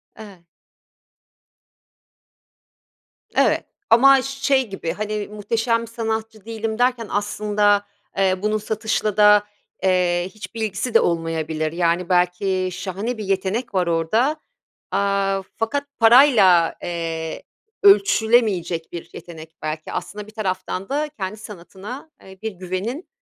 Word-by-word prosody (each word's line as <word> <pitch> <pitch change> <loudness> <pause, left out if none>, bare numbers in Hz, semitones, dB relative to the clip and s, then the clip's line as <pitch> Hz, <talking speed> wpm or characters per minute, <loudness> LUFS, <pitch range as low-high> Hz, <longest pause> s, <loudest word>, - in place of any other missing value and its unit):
Evet. 200 -6 -13 2.9
Evet - - +2 0.2
ama 270 +4 +7
şey 270 -2 0
gibi, 190 -4 -4
hani, 210 -1 -3
"Muhteşem 230 +2 -1
sanatçı 220 -2 -4
değilim" 225 0 -4
derken 245 -2 +1
aslında, 205 0 +1 0.3
eee, 190 -1 +3
bunun 215 +1 +1
satışla 215 -1 -2
da, 210 0 +6 0.4
eee, 180 -1 +2
hiçbir 225 +1 -8
ilgisi 215 +3 -2
de 230 - +7
olmayabilir. 160 -2 -1
Yani, 170 +1 0
belki 185 +1 +1
şahane 195 +6 -4
bir 215 - -5
yetenek 195 +5 -1
var 180 -2 +1
orada, 220 - +1 0.5
aaa, 200 -1 +1 0.2
fakat 285 +6 -2
parayla, 225 - +6
eee, 165 -2 -4 0.4
ölçülemeyecek 220 - +3
bir 170 - -8
yetenek 160 -1 -11
belki. 155 0 -5
Aslında 205 +3 -5
bir - - -13
taraftan 190 -3 -4
da 300 +2 -1
kendi 215 -6 -6
sanatına, 210 - -10
eee, 190 0 -13
bir 220 0 -3
güvenin 190 - -5
205 Hz, 115 wpm, -21 LUFS, 180-225 Hz, 2.9 s, ama